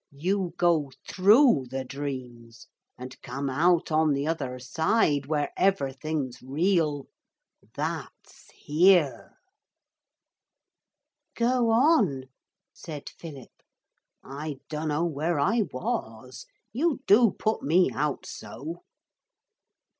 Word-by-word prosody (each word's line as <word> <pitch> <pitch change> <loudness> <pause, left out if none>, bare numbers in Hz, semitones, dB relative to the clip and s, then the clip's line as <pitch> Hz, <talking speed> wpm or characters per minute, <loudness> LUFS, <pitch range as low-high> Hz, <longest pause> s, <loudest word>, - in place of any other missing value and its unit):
You 180 +2 -1
go 165 -5 +2 0.2
through 205 - +4
the 130 0 -4
dreams 125 -4 -7 0.3
and 130 +1 -10
come 135 +2 -4
out 165 +5 +2
on 155 -1 +3
the 140 +1 -1
other 140 -6 -3
side 145 - 0
where 150 -1 -1
everything's 140 -7 -1
real. 150 +1 0 0.7
That's - - -6
here.' 155 -5 +2 2.0
'Go 240 0 +1
on,' 225 - +3 0.5
said 150 -4 -8
Philip. 145 -7 -10 0.7
'I 145 +2 -6
dunno 155 +1 -1
where 160 0 -1
I 215 +9 +2
was. - - -5 0.3
You 285 +2 0
do 225 +3 +6
put 220 0 -1
me 175 +5 +3
out 145 0 -2
so.' 150 +9 -8
155 Hz, 95 wpm, -26 LUFS, 135-185 Hz, 2.0 s, do